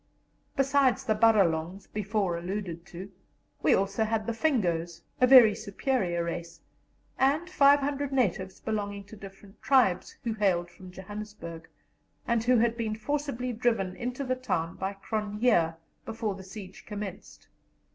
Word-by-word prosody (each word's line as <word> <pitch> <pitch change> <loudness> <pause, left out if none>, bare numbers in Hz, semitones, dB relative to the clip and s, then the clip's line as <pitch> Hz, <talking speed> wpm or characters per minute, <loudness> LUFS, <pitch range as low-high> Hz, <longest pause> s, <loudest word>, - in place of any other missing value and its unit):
Besides 270 -2 +3
the 220 - +1
Baralongs 195 -5 +2
before 205 -3 -1
alluded 175 -1 -5
to, 190 +3 -9 0.5
we - - +1
had - - +6
also 195 +3 0
the 220 +1 -1
Fingos, 175 - 0 0.2
a 250 - +6
very 245 -5 +9
superior 200 -4 -1
race, 170 0 -5 0.6
and 285 +6 +2
500 285 -3 +3
natives 195 -7 0
belonging 205 -2 -3
to 205 +2 -13
different 195 0 -13
tribes, 255 -10 +2
who 230 -2 -1
hailed 180 -5 +1
from 185 +1 -13
Johannesburg, 190 -3 -8 0.6
and 235 -2 +1
who 250 +1 +4
had 230 0 +2
been 225 -2 -2
forcibly 255 0 -3
driven 220 -6 0
into 250 +5 -4
the 255 -1 0
town 165 -10 -2
by 190 +1 -3
Cronje 210 -4 0 0.3
before 225 -2 -3
the 190 0 -10
siege 190 0 -10
commenced. 205 -3 -7
210 Hz, 135 wpm, -28 LUFS, 190-245 Hz, 0.6 s, very